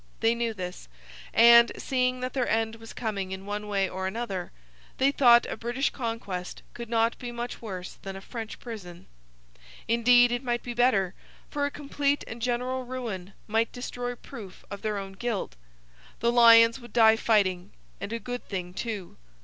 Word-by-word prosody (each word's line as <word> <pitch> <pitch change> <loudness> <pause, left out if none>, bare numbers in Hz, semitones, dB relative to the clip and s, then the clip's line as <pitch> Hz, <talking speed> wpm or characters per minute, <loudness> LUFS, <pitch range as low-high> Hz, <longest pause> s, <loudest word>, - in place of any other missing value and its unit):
They 225 0 +3
knew 235 -1 -1
this; 180 -2 -6 0.4
and, 235 +1 +8
seeing 255 -1 0
that 255 0 -3
their 255 -3 0
end 225 0 0
was 225 0 -11
coming 200 -5 -3
in 190 0 -6
one 210 +1 -4
way 195 -2 +1
or 190 0 -3
another, 195 -4 -4 0.5
they 270 +1 +3
thought 240 -4 +6
a - - -4
British 240 +5 -1
conquest 225 -7 -5
could 235 -1 -8
not 230 0 +2
be 245 -1 -5
much 240 +1 -5
worse 190 -5 -6
than 195 0 -6
a - - -6
French 225 +1 -7
prison; 190 -7 -9 0.8
indeed, 245 +1 +5
it 245 0 -1
might 240 -1 -1
be 240 - -5
better, 215 -7 +2 0.4
for 285 -1 0
a - - -3
complete 285 0 -1
and 230 +1 -8
general 250 +2 -1
ruin 225 -7 -5
might 225 +1 +1
destroy 245 0 -5
proof 220 -7 -11
of 200 - -6
their 215 -1 -1
own 195 -1 -5
guilt. 205 - -3 0.6
The 235 - +2
lions 230 0 +7
would 240 -3 -13
die 225 -2 +6
fighting 200 -5 +1 0.3
and 200 +1 -5
a 230 - -1
good 245 +1 -5
thing 180 -3 -4
too! 205 -3 -5
230 Hz, 175 wpm, -27 LUFS, 200-245 Hz, 0.8 s, and